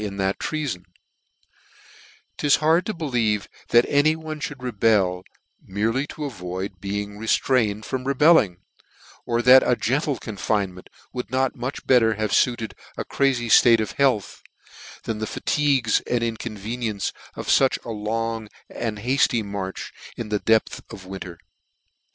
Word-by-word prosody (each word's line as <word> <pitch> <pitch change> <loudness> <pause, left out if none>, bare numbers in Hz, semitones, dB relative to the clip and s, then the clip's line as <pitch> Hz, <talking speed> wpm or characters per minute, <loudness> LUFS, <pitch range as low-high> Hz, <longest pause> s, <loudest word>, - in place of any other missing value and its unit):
in 100 -2 -5
that 95 0 -1
treafon: 145 - -3 1.6
'tis 145 -1 +4
hard 160 +3 +2
to - - 0
believe 120 - -1 0.2
that 120 0 +5
any 145 +2 +3
one 160 -1 -6
mould 145 - -4
rebel, 105 -7 +1 0.4
merely 115 +8 -1
to 150 - -6
avoid 95 -5 -6
being 105 +1 -4
re 115 - -6
ftrained 110 -5 +1
from 130 +3 -4
rebelling; 140 - +4 0.7
or 120 0 0
that 130 +1 +8
a 125 - +2
gentle 135 +3 0
confine 100 -2 -2
ment 90 - -14 0.2
would 125 - -5
not 130 0 +1
mnch 125 +3 -5
better 115 -4 +4
have 110 -1 -2
fritted 115 -4 +1 0.2
a - - -3
crazy 130 -4 +1
ilate 115 0 +6
of 110 - -2
health, 125 -9 0 0.6
than 110 -2 -3
the 110 - -3
fatigues 135 -6 +1
and 120 -1 +1
inconveni 115 +1 -4
ences 100 -2 -3 0.2
of - - -6
fuch 135 -1 +3
long 115 0 -3 0.2
and 110 -3 -3
hafty 120 0 +1
marches 100 -2 -5 0.3
in 115 -2 -5
the 105 -1 0
depth 110 +1 +1
of 95 - -10
winter. 95 -2 -8
115 Hz, 145 wpm, -23 LUFS, 105-130 Hz, 1.6 s, that